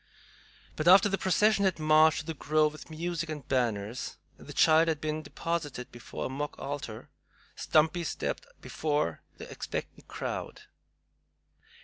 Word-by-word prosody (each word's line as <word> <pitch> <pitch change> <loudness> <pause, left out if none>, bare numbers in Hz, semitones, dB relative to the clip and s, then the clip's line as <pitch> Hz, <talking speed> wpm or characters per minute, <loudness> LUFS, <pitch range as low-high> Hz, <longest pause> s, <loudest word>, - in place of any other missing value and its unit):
But 155 - -2
after 195 +3 +8
the 195 - 0
procession 205 +2 +3
had 190 -2 +2
marched 155 0 +5
to - - -14
the 160 - -3
grove 155 0 +2
with 155 +1 -12
music 165 +1 -3
and 150 -3 -6
banners, 115 -3 -1 0.2
and - - -14
the - - -7
child 160 +1 +5
had 160 -2 0
been 155 0 -2
deposited 155 -7 -4
before 120 -1 -7
a - - 0
mock 145 +3 -4
altar, 135 -5 -6 0.4
Stumpy 160 +3 +2
stepped 160 - -3
before 145 - -1 0.2
the - - -9
expectant - - -6
crowd. - - -5
155 Hz, 145 wpm, -29 LUFS, 145-165 Hz, 0.4 s, after